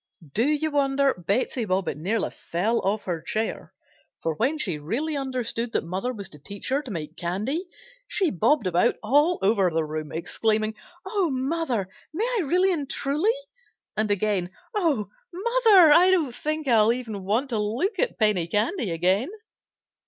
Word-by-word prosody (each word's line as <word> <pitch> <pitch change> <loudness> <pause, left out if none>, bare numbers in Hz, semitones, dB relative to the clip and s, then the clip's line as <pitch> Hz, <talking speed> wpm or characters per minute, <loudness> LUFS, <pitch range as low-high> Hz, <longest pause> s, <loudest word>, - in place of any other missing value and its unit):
Do 230 +5 +2
you 305 +1 +1
wonder 275 -1 +2
Betsey 200 +7 -1
Bobbitt 190 -2 -1
nearly 195 +9 -1
fell 210 +8 -1
off 205 +2 -1
her 170 -3 -3
chair, 220 +6 -3 0.5
for 165 - 0
when 260 - 0
she 180 - -2
really 250 - -2
understood 245 -4 -2
that - - +1
mother 190 +9 -3
was 205 -6 -7
to 150 - -13
teach 200 - -6
her 275 +2 +1
to 275 - -10
make 160 -5 -5
candy, 215 - -2 0.4
she 375 -6 +1
bobbed 245 - +2
about 180 +6 +2
all 295 +10 +3
over 195 -2 +3
the 160 -1 0
room, 155 0 -5
exclaiming: 215 +6 0 0.3
"Oh! 380 -3 0
mother, 265 - -1 0.3
may 425 +7 0
I - - +2
really 365 +5 +2
and 290 -5 -3
truly?" 305 - +1 0.6
and, 215 0 0
again: 205 -3 +1 0.2
"Oh! 320 - +1 0.2
mother, 405 -3 +5
I 360 +4 +6
don't 325 -10 +2
think 305 +4 -3
I'll 225 -3 +5
even 225 -5 -4
want 225 +8 0
to 225 -4 -1
look 290 - -1
at - - 0
penny 210 -6 +2
candy 215 - 0
again!" 185 - +1
230 Hz, 165 wpm, -25 LUFS, 195-300 Hz, 0.6 s, I